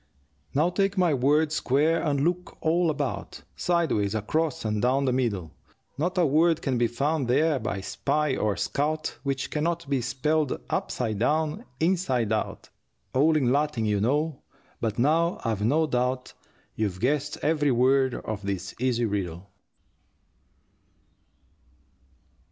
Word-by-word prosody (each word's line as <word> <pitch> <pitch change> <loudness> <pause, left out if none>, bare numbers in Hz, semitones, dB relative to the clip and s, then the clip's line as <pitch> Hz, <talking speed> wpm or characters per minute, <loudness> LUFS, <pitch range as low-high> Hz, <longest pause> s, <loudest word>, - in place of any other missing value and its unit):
Now 160 +5 +3
take 195 +1 0
my 175 -4 +3
word 145 +4 +2
square 155 +3 +2
and 140 -3 0
look 175 +3 -1
all 170 +1 +2
about, 150 - -3
Sideways, 160 - +1
across, 145 +6 -1
and 105 -1 0
down 130 +3 +2
the 130 - +1
middle, 105 - -1 0.4
Not 175 +6 -2
a 175 - +4
word 160 +3 +3
can 130 -4 0
be 120 - +3
found 140 +3 -1
there 145 +3 +2
by 100 -3 -3
spy 150 +8 0
or 105 -2 0
scout 155 +2 -2
Which 135 -2 -2
can 150 - -1
not 170 -1 -1
be 135 -2 0
spelled 145 +4 0
upside 110 -5 -2
down, 155 - 0
inside 145 - +1
out, 110 - -3 0.4
All 155 +4 +4
in 125 -5 +2
Latin, 145 -5 0
you 105 -2 +1
know; 145 +6 0 0.4
but 110 -2 -2
now 165 +7 +2
I've 110 -3 -1
no 150 +8 +3
doubt 125 -2 -1 0.4
You've 100 -4 -2
guessed 145 +5 0
every 150 -1 +2
word 130 +1 +3
of 110 -2 -5
this 100 -1 -4
easy 120 -2 +1
riddle. 95 -3 -4
140 Hz, 140 wpm, -26 LUFS, 120-155 Hz, 0.4 s, a